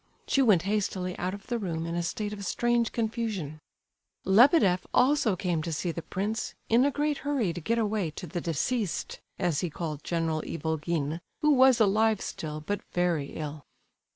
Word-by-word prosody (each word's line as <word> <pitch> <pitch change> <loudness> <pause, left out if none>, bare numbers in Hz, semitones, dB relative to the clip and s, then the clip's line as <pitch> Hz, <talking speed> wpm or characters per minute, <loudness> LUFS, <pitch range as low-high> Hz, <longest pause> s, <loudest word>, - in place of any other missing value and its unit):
She 275 - +3
went 210 -10 +4
hastily 190 -2 -1
out 185 +2 -2
of 200 - -12
the 240 -1 -2
room 165 -5 -3
in 170 - -3
a 175 - 0
state 205 +4 -3
of 200 -1 -7
strange 240 +5 +1
confusion. 220 - -3 0.7
Lebedeff 200 - +5
also 255 -6 +4
came 175 -3 -1
to 165 - -4
see 170 +3 -1
the 170 - -5
prince, 205 +6 -3
in 235 +4 +5
a - - +4
great 295 +1 -1
hurry 265 -11 0
to 175 - -6
get 230 +9 0
away 210 -5 0
to - - -6
the 175 +1 -4
"deceased," 190 - -2 0.2
as 175 -5 0
he 180 - -1
called 155 -2 -5
General 165 -2 -1
Ivolgin, 160 -1 -2 0.2
who 300 -1 +4
was 260 -2 +6
alive 215 0 +3
still, 155 -4 -5
but 200 +6 -3
very 175 -5 0
ill. 150 -1 -6
190 Hz, 180 wpm, -28 LUFS, 165-225 Hz, 0.7 s, was